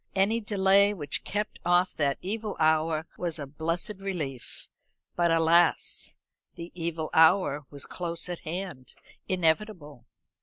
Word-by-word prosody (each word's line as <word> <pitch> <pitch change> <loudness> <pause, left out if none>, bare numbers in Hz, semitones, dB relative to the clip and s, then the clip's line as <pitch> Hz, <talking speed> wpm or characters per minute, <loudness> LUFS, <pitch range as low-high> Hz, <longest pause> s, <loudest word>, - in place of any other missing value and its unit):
Any 200 +4 +2
delay 200 -1 +3
which 145 -6 -3
kept 210 +1 -3
off 175 +1 +3
that 140 -2 0
evil 210 +2 -4
hour 160 0 +2
was 175 -2 -2
a 145 - -5
blessed 165 +8 -3
relief; 155 -11 -5 0.5
but 175 -1 +2
alas! 165 +1 +2 0.4
the 170 0 -8
evil 165 -2 -4
hour 160 -3 +4
was 140 -2 -7
close 170 -1 -3
at 175 -1 -4
hand, 170 -5 -6 0.3
inevitable. 165 - -1
170 Hz, 125 wpm, -28 LUFS, 155-190 Hz, 0.5 s, hour